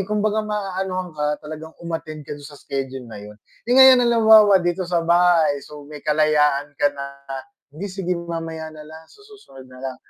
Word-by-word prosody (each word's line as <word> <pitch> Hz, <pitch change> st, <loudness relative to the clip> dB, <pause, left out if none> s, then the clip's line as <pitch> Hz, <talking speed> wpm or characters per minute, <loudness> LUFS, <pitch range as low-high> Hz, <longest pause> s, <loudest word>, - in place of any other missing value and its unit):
kumbaga 210 Hz, 0 st, 0 dB
maanuhan 190 Hz, -3 st, -3 dB
ka, 150 Hz, 0 st, -1 dB
talagang 155 Hz, +1 st, -8 dB
um-attend 160 Hz, -2 st, -6 dB
ka -, -, -8 dB
dun 145 Hz, -, -13 dB
sa 150 Hz, -, -13 dB
schedule 135 Hz, -2 st, -5 dB
na -, -, -9 dB
yun. 105 Hz, +1 st, -12 dB, 0.3 s
Eh, -, -, +2 dB
ngayon 265 Hz, -1 st, +8 dB
halimbawa 220 Hz, -4 st, +6 dB
dito 175 Hz, +1 st, -1 dB
sa 175 Hz, -1 st, 0 dB
bahay, 170 Hz, -3 st, +3 dB
so 150 Hz, -1 st, -11 dB
may 150 Hz, -, -9 dB
kalayaan 150 Hz, -2 st, +2 dB
ka 145 Hz, -, +3 dB
na, 140 Hz, 0 st, -6 dB, 0.7 s
"Hindi, 200 Hz, +6 st, -6 dB
sige 185 Hz, -1 st, -3 dB
mamaya 165 Hz, -2 st, -6 dB
na 155 Hz, -1 st, -11 dB
lang, 160 Hz, +1 st, -12 dB
sa 415 Hz, -, -20 dB
susunod 410 Hz, -, -15 dB
na 125 Hz, 0 st, -15 dB
lang." 130 Hz, -1 st, -5 dB
165 Hz, 185 wpm, -21 LUFS, 150-195 Hz, 0.7 s, ngayon